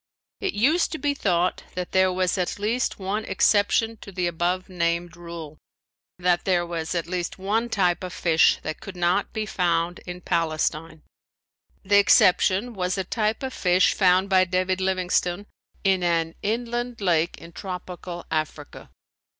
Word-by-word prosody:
It 390 - -2
used 295 +12 +2
to - - -2
be 290 -2 0
thought 180 -8 0
that 180 -1 -4
there 185 0 +3
was 185 -1 0
at 180 -2 -2
least 225 +4 -1
one 200 +3 -2
exception 220 +2 +2
to 200 - -11
the 180 -1 -2
above 175 +2 -1
named 170 -1 -1
rule: 170 -3 -9 0.6
that 175 -1 +1
there 175 -2 +1
was 170 -1 -4
at 170 - -1
least 175 0 -3
one 215 +5 -1
type 185 -5 +1
of 180 - -5
fish 165 -2 +3
that 155 - -5
could 200 - -9
not 175 +3 +1
be 215 -1 -3
found 175 -3 0
in 180 0 -6
Palestine. 160 -2 -1 0.8
The 200 +1 +5
exception 195 +3 +4
was 185 -1 -2
a 190 - 0
type 215 +5 -1
of 260 -1 -4
fish 180 0 +3
found 185 0 +3
by 190 -2 +4
David 185 +1 0
Livingstone 185 0 0 0.4
in 190 -1 +2
an 165 -2 0
inland 240 +2 -2
lake 175 -4 +1
in 170 - -12
tropical 180 -1 -7
Africa. 155 -1 -4
185 Hz, 160 wpm, -24 LUFS, 175-200 Hz, 0.8 s, The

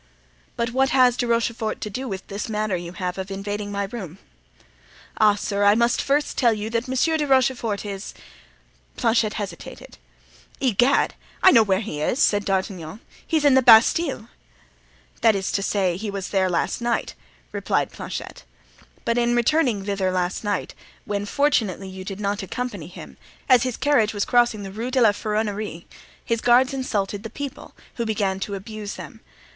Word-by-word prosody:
"But 235 0 -1
what 265 +2 +2
has 255 -2 +4
De 245 - -1
Rochefort 230 -1 -1
to 210 - -3
do 260 +6 -4
with 190 -4 -5
this 200 +3 -5
manner 215 -2 -1
you 175 0 -6
have 180 -1 -4
of 190 +1 -5
invading 205 +1 -4
my 200 0 -1
room?" 195 -5 -7 1.0
"Ah, 210 -1 +5
sir! 205 0 -2
I 205 +1 +6
must 235 +1 +2
first 290 +2 0
tell 235 -4 +4
you 215 +1 -5
that 230 +2 -1
Monsieur 260 +5 +1
de 300 -1 -1
Rochefort 255 -6 +1
is——" 200 0 -6 0.8
Planchet 220 -2 +2
hesitated. 205 -3 -8 0.6
"Egad, 255 +1 +3 0.3
I 375 - +9
know 230 - +7
where 195 -2 +1
he 155 -9 -5
is," 195 - 0
said 205 -7 +2
D'Artagnan. 190 -2 -2 0.3
"He's 315 -3 +1
in 285 - +6
the 265 - +6
Bastile." 240 +2 +5 0.9
"That 225 -2 +5
is 195 -1 -2
to 195 - 0
say, 190 -3 0
he 210 +2 -4
was 195 -2 -4
there," 190 -2 +1 1.0
replied - - -1
Planchet. - - -7 0.6
"But 235 +1 +1
in 240 0 +2
returning 240 -5 +2
thither 195 -2 0
last 180 +2 -1
night, 205 -1 -2 0.3
when 205 0 -3
fortunately 215 - 0
you 190 0 -8
did 195 +1 -6
not 205 0 -1
accompany 250 +6 -5
him, - - -11 0.3
as 255 -3 +6
his 255 -2 -2
carriage 230 -7 +2
was 200 - 0
crossing 240 -4 +2
the 195 - -7
Rue 225 +5 -4
de 260 0 +1
la 225 -4 +6
Ferronnerie 210 -4 -3 0.4
his 230 -1 -1
guards 255 +3 +4
insulted 205 -6 -2
the 225 - -7
people, 280 +4 -8 0.2
who 235 - -1
began 195 -3 -1
to 200 +1 -4
abuse 210 +1 -7
them. - - -10
215 Hz, 170 wpm, -23 LUFS, 200-245 Hz, 1.0 s, I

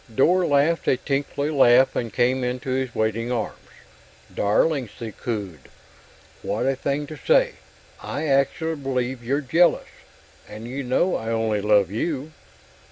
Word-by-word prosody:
Dor 175 +7 +3
laughed 145 +3 +2
a 130 - +3
tinkly 140 +2 -2
laugh 130 -2 +5
and 115 -2 -2
came 125 +5 +1
into 125 +1 -3
his 130 -2 -2
waiting 110 +2 -1
arms. 120 -3 -3 0.7
"Darling," 130 +6 +1
she 115 -2 -6
cooed. 100 - -6 0.7
"What - - -2
a 135 - +1
thing 140 +2 -2
to 155 - -9
say. - - +3 0.5
I - - -4
actually 150 +3 +1
believe 130 -2 -3
you're 140 +5 0
jealous 165 +6 +2 0.6
and 110 +2 -8
you 135 +3 -4
know 135 +8 +1
I 110 - -4
only 110 -2 0
love 100 -3 +3
you." 145 +6 -3
130 Hz, 145 wpm, -23 LUFS, 115-145 Hz, 0.7 s, laugh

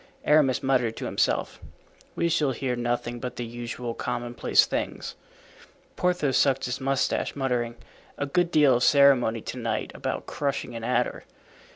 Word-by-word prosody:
Aramis 145 -4 +3
muttered 125 -4 +1
to - - -4
himself, - - 0 0.6
"We 170 - +1
shall 155 -5 +1
hear 125 0 -2
nothing 120 0 -2
but 125 0 -5
the 120 - -4
usual 120 0 -5
commonplace 120 +1 +1
things." - - -4 0.8
Porthos 175 -7 +1
sucked 135 -2 +2
his 125 +2 -3
mustache, 135 0 0
muttering, 125 -4 -1 0.4
"A 145 - -1
good 175 +4 +1
deal 150 -5 +5
of 125 - -1
ceremony 135 -6 +4
to 125 - -6
night 115 -1 -2
about - - -4
crushing 140 -3 -3
an 115 - -6
adder." 125 +1 -1
125 Hz, 150 wpm, -26 LUFS, 120-140 Hz, 0.8 s, deal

